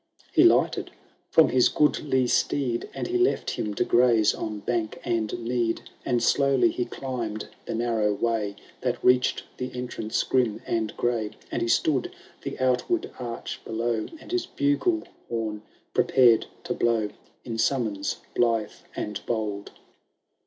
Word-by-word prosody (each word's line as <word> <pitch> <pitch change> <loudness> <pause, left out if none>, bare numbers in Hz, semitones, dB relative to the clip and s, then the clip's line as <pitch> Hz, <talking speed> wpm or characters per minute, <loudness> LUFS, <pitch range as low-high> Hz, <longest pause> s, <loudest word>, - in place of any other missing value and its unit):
He - - +6
lighted - - +4 0.4
from - - +6
his 125 -1 +4
goodly 140 -3 +2
steed. 125 -1 0
And - - -4
he 365 0 0
left 370 - +2
him 105 -1 -3
to - - +2
graze 120 -3 +4
on 105 -1 -4
bank 115 -1 -1
and 115 -3 0
mead; 115 -1 -1 0.2
And 120 -1 +1
slowly 140 - +4
he 360 +2 -2
climbed 120 - -4 0.2
the - - -2
narrow 115 -2 +1
way. 105 -1 -1 0.3
That - - 0
reached 125 0 +4
the 125 - -4
entrance 125 -3 -2
grim 120 -5 +1
and 110 -2 -2
gray. 115 -3 0 0.2
And - - -1
he - - 0
stood 130 +2 +2 0.3
the - - -5
outward 130 - +1
arch 120 -2 -5
below, 115 0 -1
And - - -12
his 360 -1 0
bugle 145 - +1 0.3
horn 110 -2 -2 0.3
prepared 120 -4 +5 0.2
to - - -2
blow. 115 -3 +1 0.4
In 115 -2 -4
summons 110 -7 0
blithe 115 -3 +2 0.2
and 105 -1 -4
bold. 105 -3 -2
120 Hz, 145 wpm, -26 LUFS, 110-130 Hz, 0.4 s, He